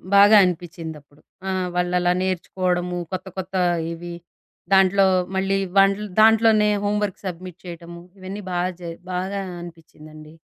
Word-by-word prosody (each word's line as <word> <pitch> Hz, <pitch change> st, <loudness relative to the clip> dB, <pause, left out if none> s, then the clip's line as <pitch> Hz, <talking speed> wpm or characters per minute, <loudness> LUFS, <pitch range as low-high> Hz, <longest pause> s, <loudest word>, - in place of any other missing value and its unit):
బాగా 205 Hz, +2 st, +8 dB
అనిపిచ్చిదప్పుడు. 160 Hz, -4 st, -5 dB, 0.3 s
ఆ! -, -, -1 dB, 0.3 s
వాళ్ళలా 180 Hz, 0 st, +1 dB
నేర్చుకోవడము, 180 Hz, -1 st, -1 dB
కొత్త, 185 Hz, 0 st, -4 dB
కొత్త 190 Hz, 0 st, -5 dB, 0.4 s
ఇవి 175 Hz, +1 st, -8 dB, 0.6 s
దాంట్లో 195 Hz, +1 st, +5 dB, 0.3 s
మళ్ళీ 195 Hz, +1 st, +1 dB, 0.2 s
వన్ 195 Hz, 0 st, +6 dB, 0.3 s
దాంట్లోనే 220 Hz, -1 st, +5 dB
హోమ్‌వర్క్ 205 Hz, -1 st, -1 dB
సబ్మిట్ 180 Hz, -1 st, -7 dB
చేయటము, 170 Hz, 0 st, -9 dB, 0.2 s
ఇవన్నీ 195 Hz, +2 st, -7 dB
బాగా 175 Hz, +1 st, 0 dB
జ -, -, -10 dB, 0.3 s
బాగా 190 Hz, +2 st, -2 dB, 0.2 s
అనిపించిందండి. 155 Hz, -2 st, -13 dB
180 Hz, 115 wpm, -22 LUFS, 170-195 Hz, 0.6 s, బాగా